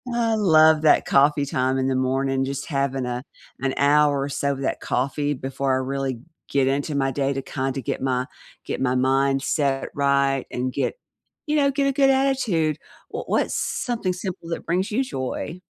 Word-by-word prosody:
I 230 -2 +1
love 160 -6 +5
that 155 - +5
coffee 145 +1 +3
time 130 -1 0
in 130 0 0
the 135 - 0
morning, 135 +1 0
just 140 +1 -4
having 140 -3 -1
a 125 0 -3 0.4
an 135 0 0
hour 145 0 +4
or 140 - -3
so 140 0 -1
of 135 - -7
that 135 - -1
coffee 145 +3 -1
before 135 +1 -2
I - - +2
really 130 -2 -3 0.3
get 135 -2 +2
into 145 +2 -1
my 135 -1 +1
day, 135 +1 0
to 135 - -3
kinda 135 0 -3
get - - -3
my 130 -1 0 0.4
get - - -4
my 130 -1 +1
mind 135 +1 +2
set 140 -3 0
right 140 -1 +2
and 125 +1 -2
get, 140 - -1 0.5
you 300 - +1
know, 280 -1 +4
get 275 +1 0
a - - +2
good 270 0 +4
attitude. 255 - +1 0.3
W - - -4
what's - - 0
something 225 -7 -1
simple 180 -2 -6
that 165 - -4
brings 185 +4 0
you 250 +6 +1
joy? 155 - -5
140 Hz, 190 wpm, -23 LUFS, 135-160 Hz, 0.5 s, love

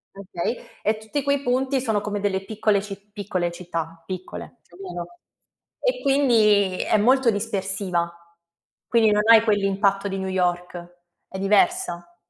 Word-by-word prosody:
Okay, 195 +3 -4 0.2
e 215 +1 +1
tutti 220 +7 -3
quei 280 0 0
punti 260 +2 +1
sono 220 -5 0
come 210 0 -3
delle 195 -1 -1
piccole 210 0 +1
ci 200 -1 -8
piccole 185 -4 -2
città, 165 -2 -6
piccole, 185 +6 -7
cioè 175 - -21
capito. 185 - -8 0.6
E - - 0
quindi 215 -9 +3
è - - +2
molto 255 +3 +4
dispersiva, 195 -4 -1 0.8
quindi 225 -2 +4
non 210 0 +3
hai 225 -1 +8
quell'impatto 200 -2 +1
di 195 -1 -3
New 190 - -3
York, 175 -1 -2 0.3
è 190 - -8
diversa. 195 - +1
200 Hz, 140 wpm, -23 LUFS, 185-225 Hz, 0.8 s, hai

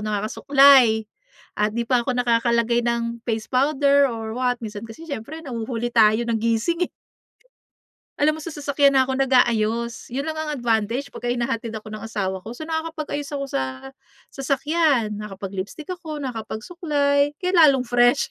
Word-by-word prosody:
nakakasuklay. 230 +2 +4 0.5
At 210 +1 +1
'di 235 - 0
pa 250 0 +3
ako 250 0 -2
nakakalagay 235 0 +2
ng 235 0 -2
face 220 -2 -3
powder 280 +1 +3
or 225 -2 -5
what, 250 0 0
minsan 210 -1 -7
kasi 320 +9 -11
siyempre, 305 +3 -7
nahuhuli 240 -2 -4
tayo 220 0 +4
ng 230 -1 -1
gising, 230 +11 0
eh. - - -42 1.3
Alam 305 +2 +2
mo - - -8
sa 330 0 -7
sasakyan 285 -1 +2
na 265 - +5
ako 265 - -2
nag-aayos. 235 -3 +1
Yun 260 +3 -3
lang 315 +1 -4
ang 310 -1 -2
advantage 240 +2 -1
pagka 245 - -8
hinahatid 230 -1 -3
ako 215 0 -8
ng 215 +1 -7
asawa 195 -4 -3
ko. 230 - -6
So 280 - -9
nakakapag-ayos 320 -2 -4
ako 275 - -2
sa - - 0 0.7
sasakyan, 275 -5 0
nakakapag-lipstick 200 - -7
ako, 320 -5 -6
nakakapag-suklay 285 - -1
kaya 365 +1 0
lalong 280 -5 +6
fresh. 245 +2 +2
245 Hz, 155 wpm, -22 LUFS, 225-285 Hz, 1.3 s, lalong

